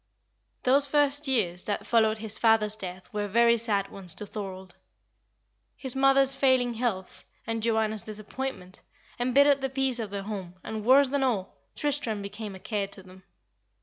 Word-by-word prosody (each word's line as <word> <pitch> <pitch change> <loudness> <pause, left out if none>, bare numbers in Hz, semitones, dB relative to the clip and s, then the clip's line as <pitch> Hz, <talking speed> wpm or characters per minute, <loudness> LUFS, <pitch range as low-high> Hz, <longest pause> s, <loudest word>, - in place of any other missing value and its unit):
Those 275 +3 +3
first 290 0 +3
few 265 -1 +3
years 180 -5 0
that 205 - -2
followed 220 -2 +3
his 220 0 -1
father's 220 -2 +3
death 185 +1 -8
were 205 0 -2
very 235 +3 +4
sad 205 -4 -1
ones 185 -3 -5
to 210 - -6
Thorold. 190 -3 -7 1.0
His 265 -2 -3
mother's 270 0 +4
failing 260 -3 +2
health, 220 -6 -3 0.2
and 225 0 -2
Joanna's 220 -1 +1
disappointment, 215 -2 -6 0.4
embittered 280 +3 +4
the 270 - -1
peace 265 -2 0
of 220 -3 -4
their 200 0 -5
home; 195 -4 -6
and, 220 -1 -5
worse 265 +4 +5
than 280 +1 0
all, 215 - -1 0.2
Tristram 265 -8 -1
became 205 0 -7
a - - -10
care 205 0 -2
to 195 -1 -6
them. 185 0 -15
220 Hz, 165 wpm, -27 LUFS, 200-265 Hz, 1.0 s, worse